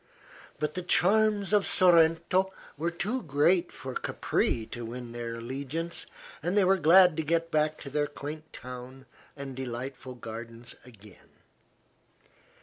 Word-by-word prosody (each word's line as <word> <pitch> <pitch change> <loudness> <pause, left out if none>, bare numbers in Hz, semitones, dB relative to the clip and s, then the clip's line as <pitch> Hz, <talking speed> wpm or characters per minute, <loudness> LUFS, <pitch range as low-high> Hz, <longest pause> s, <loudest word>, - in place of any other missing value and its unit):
But 150 +1 -2
the 180 - -3
charms 205 +2 +3
of 205 -1 +5
Sorrento 175 +2 +4 0.2
were 165 +4 -1
too 210 +9 -2
great 170 +3 +2
for 130 -1 -7
Capri 115 -2 -1
to 120 - -5
win 120 +1 -7
their 120 -1 -5
allegiance, 140 +8 -4 0.3
and 175 +5 -1
they 205 - +6
were 190 +1 +4
glad 180 +2 +7
to 160 - 0
get 165 +2 0
back 155 0 +1
to 140 - -7
their 145 +1 +1
quaint 150 +2 -8
town 125 +2 -9 0.3
and 135 -2 -6
delightful 130 0 -6
gardens 115 0 -8
again. 105 -5 -17
150 Hz, 140 wpm, -29 LUFS, 125-175 Hz, 0.3 s, glad